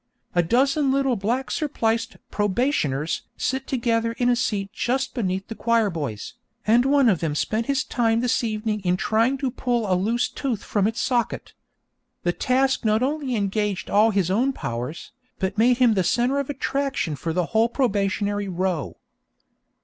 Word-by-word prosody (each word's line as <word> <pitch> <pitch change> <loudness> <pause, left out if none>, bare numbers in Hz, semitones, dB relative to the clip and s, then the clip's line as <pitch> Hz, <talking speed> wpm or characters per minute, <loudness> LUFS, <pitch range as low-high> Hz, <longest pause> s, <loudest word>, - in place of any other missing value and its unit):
A 175 - +4
dozen 270 - +2
little 270 -2 +2
black 235 +6 -2
surpliced 230 -7 -1
'probationers' 190 - 0 0.2
sit 265 0 -2
together 230 -2 0
in 245 +1 +1
a 245 - +4
seat 205 -5 -1
just 255 +3 -1
beneath 190 -5 -2
the - - -5
choir 230 -2 +1
boys, 140 -11 -5 0.3
and 235 +3 +4
one 275 -1 +4
of 190 -7 +3
them 155 -3 -2
spent 220 +8 -1
his 275 -1 +1
time 230 -1 +1
this 250 0 +1
evening 215 -1 -1
in 180 0 +1
trying 230 +7 +1
to 265 -2 -2
pull 240 -2 -1
a 190 - +1
loose 215 +7 +1
tooth 245 -7 -3
from 205 -1 +1
its 225 +2 -3
socket. 240 -3 -1 0.7
The 175 - +1
task 265 +4 +1
not 220 +2 +2
only 275 -2 -1
engaged 205 -1 -1
all 210 +2 +5
his 190 -4 +1
own 255 +7 +2
powers, 120 - -5 0.3
but 190 +2 -2
made 245 +2 +4
him 245 -3 +4
the 190 -3 +1
centre 245 +9 +1
of 280 - -3
attraction 275 - -1
for 165 +4 -3
the 180 +1 0
whole 225 +1 +4
probationary 205 -4 0
row. 180 -5 -2
225 Hz, 170 wpm, -24 LUFS, 195-255 Hz, 0.7 s, all